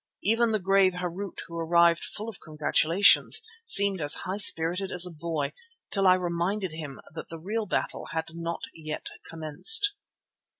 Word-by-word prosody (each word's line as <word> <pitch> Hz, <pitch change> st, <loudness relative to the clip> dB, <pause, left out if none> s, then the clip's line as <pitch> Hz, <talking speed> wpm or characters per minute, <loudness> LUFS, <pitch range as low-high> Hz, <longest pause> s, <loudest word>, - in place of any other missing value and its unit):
Even 230 Hz, +3 st, +1 dB
the 220 Hz, -, 0 dB
grave 195 Hz, -1 st, +1 dB
Harût, 180 Hz, +2 st, -7 dB
who 170 Hz, -, -12 dB
arrived 170 Hz, 0 st, +1 dB
full 215 Hz, +2 st, -7 dB
of 225 Hz, -4 st, -9 dB
congratulations, 160 Hz, -, +3 dB, 0.2 s
seemed 200 Hz, -, +5 dB
as 145 Hz, 0 st, 0 dB
high 190 Hz, +2 st, -4 dB
spirited 180 Hz, -1 st, +3 dB
as 180 Hz, 0 st, +5 dB
a 180 Hz, -, -6 dB
boy, 155 Hz, -3 st, -5 dB, 0.4 s
till 195 Hz, -2 st, +1 dB
I 185 Hz, -, +5 dB
reminded 180 Hz, +2 st, -3 dB
him 155 Hz, -4 st, -9 dB
that 165 Hz, -, -10 dB
the 165 Hz, -, -9 dB
real 210 Hz, +6 st, -5 dB
battle -, -, -4 dB
had 160 Hz, -1 st, -4 dB
not 170 Hz, 0 st, -7 dB
yet 155 Hz, -1 st, -8 dB, 0.2 s
commenced. 165 Hz, -, +3 dB
175 Hz, 160 wpm, -25 LUFS, 165-200 Hz, 0.4 s, seemed